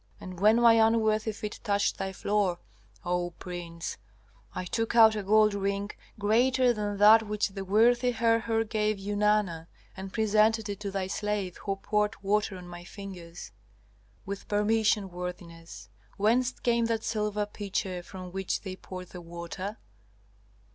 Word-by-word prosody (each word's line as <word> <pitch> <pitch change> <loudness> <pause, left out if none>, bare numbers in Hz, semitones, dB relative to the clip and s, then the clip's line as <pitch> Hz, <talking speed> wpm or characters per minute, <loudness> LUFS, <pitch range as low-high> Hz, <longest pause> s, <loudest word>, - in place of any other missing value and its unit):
And 185 -2 -9
when 210 +3 +5
my 235 -1 +7
unworthy 220 -1 +2
feet 210 0 -6
touched 200 -1 0
thy 190 0 -2
floor, 195 -2 0 0.5
O 175 -1 -1
prince, 170 -2 -6 0.6
I 185 - -3
took 225 +4 -2
out 220 -2 +7
a 210 - -2
gold 215 +1 +4
ring, 200 +1 -2 0.3
greater 245 +4 +3
than 205 -2 -3
that 215 +2 +8
which 210 0 0
the 195 0 -6
worthy 235 +5 +3
Herhor 230 -1 +1
gave 215 -1 -1
Eunana, 205 -4 0 0.3
and 190 0 -7
presented 220 0 +2
it 200 -1 -4
to 205 -1 -4
thy 195 -1 -2
slave 205 -1 -3
who 195 -1 -3
poured 210 +1 0
water 205 0 0
on 180 -1 -10
my 175 0 -9
fingers. 175 - -9 0.7
With 200 0 -6
permission, 210 -1 +1
worthiness, 170 - -8 0.3
whence 240 +5 +2
came 235 -2 0
that 230 -1 -1
silver 210 -1 -1
pitcher 195 -3 -4
from 185 0 -9
which 190 0 -2
they 190 -2 -6
poured 185 -1 -9
the 180 - -9
water?" 175 +4 -6
205 Hz, 150 wpm, -28 LUFS, 185-220 Hz, 0.7 s, that